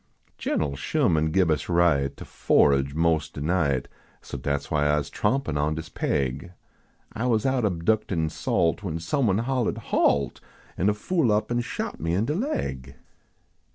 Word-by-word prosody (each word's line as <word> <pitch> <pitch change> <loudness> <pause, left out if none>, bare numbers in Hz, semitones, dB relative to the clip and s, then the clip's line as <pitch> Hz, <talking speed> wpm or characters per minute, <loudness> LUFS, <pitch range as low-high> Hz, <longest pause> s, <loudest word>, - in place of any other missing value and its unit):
Gen - - 0
l 70 -2 -3
Sherman 80 +3 +1
gib 85 0 +2
us 75 +2 -1
right 80 -6 +2
To - - -9
forage 70 0 +2
mos" 80 -1 +1
de - - -9
night, 75 -4 0 0.4
So - - -8
dat 70 -1 -1
s - - -14
why 75 -2 +2
Ise 70 -2 -3
trompin 105 - 0
on 75 +1 0
dis 80 - -6
paig. 70 +6 -2 0.6
I 120 +3 -2
was 115 -2 +1
out 130 -2 +1
abductin 90 -3 0
salt, 85 +5 0
When 90 -6 -3
somebody 105 - +1
hollahed 125 -1 -1
"halt! 70 -3 +1 0.2
" - - -27
An 90 - +2
de 105 - +3
fool 150 - +1
up 105 +2 0
an 120 0 +1
shot - - -5
me 80 +2 -1
in 100 +4 +1
de 150 - -1
laig. 155 - -3
85 Hz, 175 wpm, -25 LUFS, 75-110 Hz, 0.6 s, de